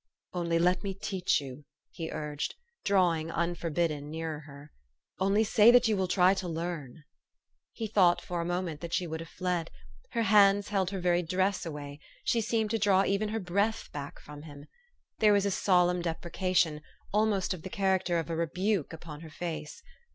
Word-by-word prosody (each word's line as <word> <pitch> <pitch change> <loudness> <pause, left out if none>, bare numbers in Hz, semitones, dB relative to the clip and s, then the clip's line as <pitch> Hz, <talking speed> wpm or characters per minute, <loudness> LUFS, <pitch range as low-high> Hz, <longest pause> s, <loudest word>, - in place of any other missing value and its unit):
" - - -55
Only 170 -2 0
let 180 +3 +2
me 195 -1 -3
teach 190 -2 0
you! 140 0 -9
" - - -63
he 165 -1 -5
urged, 150 -1 -4 0.3
drawing, 175 -5 +2
unforbidden, 165 -3 -1
nearer 160 -1 -4
her. 140 +1 -13 0.2
" 65 - -43
Only 195 +3 +3
say 220 +1 +6
that 245 0 +6
you 220 - +2
will 190 -1 0
try 180 +1 +4
to 190 -2 -4
learn! 165 -4 -5 0.3
" - - -60 0.3
He 225 - -5
thought 180 -5 +4
for 175 -1 -4
a - - -2
moment 175 -3 -3
that 170 -1 -6
she 180 - 0
would 160 -1 -4
have 165 0 -8
fled; 180 -3 -2 0.4
her 230 - +1
hands 205 -1 +5
held 195 -3 +1
her 195 -1 -4
very 175 0 +2
dress 185 +2 0
away; 145 -2 -7 0.2
she 230 - +1
seemed 220 -1 0
to 225 - 0
draw 195 -1 +4
even 200 +2 0
her 220 +1 -2
breath 200 +4 -1
back 145 -1 -7
from 145 0 -11
him. 145 -2 -11 0.5
There 210 -1 +5
was 200 -1 +3
a 200 - +1
solemn 180 -2 +3
deprecation, 170 -1 0 0.3
almost 210 -3 +2
of 180 - -8
the 190 - -7
character 190 -4 +1
of 165 - -2
a - - -1
rebuke, 180 +2 -1
upon 160 -2 -9
her 165 - -10
face. 155 -2 -6
180 Hz, 195 wpm, -30 LUFS, 160-195 Hz, 0.5 s, say